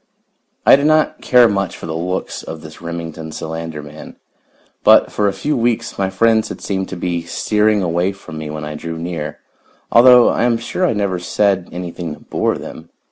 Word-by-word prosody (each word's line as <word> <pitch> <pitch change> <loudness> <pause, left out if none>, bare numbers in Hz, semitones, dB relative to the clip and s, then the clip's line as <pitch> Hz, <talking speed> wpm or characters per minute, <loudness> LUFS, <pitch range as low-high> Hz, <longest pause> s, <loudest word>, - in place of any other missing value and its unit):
I - - +9
did 140 +2 +1
not 155 0 +2
care 125 -2 +5
much 100 -4 -2
for - - -8
the 80 -1 -4
looks 90 +3 -3
of 80 -1 -8
this 80 +1 -12
Remington 80 -1 -6
Solander 80 -1 -6
man, 75 +1 -11 0.7
but - - +6
for 105 - +1
a - - +2
few 120 +11 -2
weeks 120 -4 -1
my 95 -1 +1
friends 110 +3 +2
had - - -7
seemed 95 -1 -3
to - - -5
be 85 -1 -2
steering 105 +4 +1
away 90 +2 0
from 90 -5 -10
me 80 -1 -6
when 75 0 -5
I 75 - -5
drew 80 +2 -6
near, 80 -3 -5 0.5
although 125 0 +7
I - - 0
am 120 -1 +2
sure 180 +10 -1
I - - +1
never 100 -4 -1
said 95 0 0
anything 85 -2 -5
to - - -18
bore - - -1
them. 80 +1 -10
90 Hz, 195 wpm, -18 LUFS, 80-105 Hz, 0.7 s, I